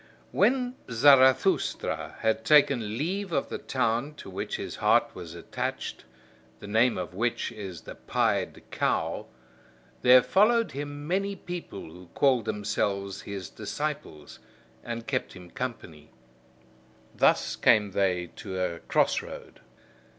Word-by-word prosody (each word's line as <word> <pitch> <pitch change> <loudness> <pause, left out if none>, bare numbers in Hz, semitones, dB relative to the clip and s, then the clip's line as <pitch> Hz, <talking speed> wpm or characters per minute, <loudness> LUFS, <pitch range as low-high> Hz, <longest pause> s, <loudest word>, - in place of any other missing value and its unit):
When 250 0 +2
Zarathustra 130 +1 +3
had 110 0 +1
taken 120 -6 +4
leave 190 +7 -2
of - - -1
the - - -4
town 130 +3 -1
to 95 - -10
which 95 - -4
his - - -5
heart - - +3
was 85 -1 -9
attached, 85 - -5 0.5
the - - -10
name 110 +4 +3
of 90 -1 -5
which 120 +5 -1
is 95 -7 -8
"The - - -9
Pied - - -1
Cow," - - -1 0.7
there 125 0 +7
followed 230 +3 +3
him 145 +1 -6
many 195 +3 0
people 175 - -7
who 90 +2 -13
called 130 -5 +3
themselves 100 -2 -2
his 100 -3 -6
disciples, 75 -2 -5 0.4
and 115 -1 -5
kept 130 -2 -2
him 90 -2 -12
company. 100 - -6 1.1
Thus - - +3
came 105 -2 +4
they 90 -3 0
to 95 -1 -5
a 90 -2 -2
crossroad. - - -1
115 Hz, 125 wpm, -27 LUFS, 95-145 Hz, 1.1 s, there